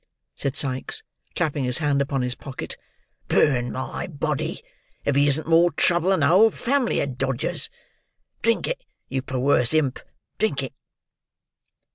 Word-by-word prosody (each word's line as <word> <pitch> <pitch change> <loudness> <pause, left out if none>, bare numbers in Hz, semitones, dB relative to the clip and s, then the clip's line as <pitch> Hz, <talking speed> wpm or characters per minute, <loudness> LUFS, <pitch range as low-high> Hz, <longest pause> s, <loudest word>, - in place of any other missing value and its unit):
said 135 -1 -2
Sikes 130 -2 -1 0.3
clapping 150 -5 0
his 125 -1 +1
hand 145 -3 +1
upon 135 -2 -1
his 125 0 -1
pocket. 135 0 -7 0.5
"Burn 125 -4 +3
my 130 0 -4
body, 150 -3 -3 0.4
if 145 - +1
he 145 +1 +4
isn't 145 +2 +1
more 165 +2 +5
trouble 175 +3 +3
than 190 -6 +3
a - - +5
whole 195 +8 +6
family 255 +2 0
of 130 -2 -4
Dodgers. 135 -2 0 0.7
Drink - - +2
it, - - -3 0.3
you 130 0 -1
perwerse 130 0 +1
imp; 140 -5 +1 0.4
drink 165 -10 +1
it!" 130 - -6
140 Hz, 145 wpm, -24 LUFS, 130-160 Hz, 0.7 s, whole